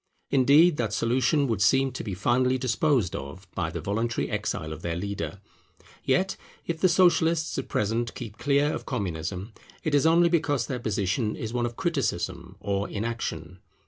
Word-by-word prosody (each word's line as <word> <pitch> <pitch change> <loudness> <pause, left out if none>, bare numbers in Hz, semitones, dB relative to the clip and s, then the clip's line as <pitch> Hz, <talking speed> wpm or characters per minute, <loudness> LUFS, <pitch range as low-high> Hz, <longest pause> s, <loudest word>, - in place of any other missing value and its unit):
Indeed 145 +5 +5
that 110 -3 -1
solution 130 +6 +2
would 115 -6 -1
seem 135 +7 +4
to 130 - -6
be 100 -4 -4
finally 125 +6 +2
disposed 125 - +1
of 70 +8 -7
by 85 -3 -1
the 85 0 -5
voluntary 110 +6 -1
exile 80 0 -2
of - - -9
their 85 -1 -2
leader. 100 +1 -4 0.6
Yet, 185 +9 +1 0.3
if 165 -1 -3
the 185 - +5
Socialists 170 -2 +3
at 135 - -6
present 115 +3 -1
keep 115 -4 -8
clear 145 +2 +2
of - - -6
Communism, 95 - -3 0.3
it 155 - -1
is 145 +2 +4
only 170 +1 +5
because 145 -7 +1
their 125 +2 -3
position 105 0 -1
is 110 0 -5
one 120 -1 0
of 120 - -8
criticism 165 -4 -2
or 100 0 -2
inaction. 100 -6 -4
120 Hz, 170 wpm, -27 LUFS, 100-145 Hz, 0.6 s, Indeed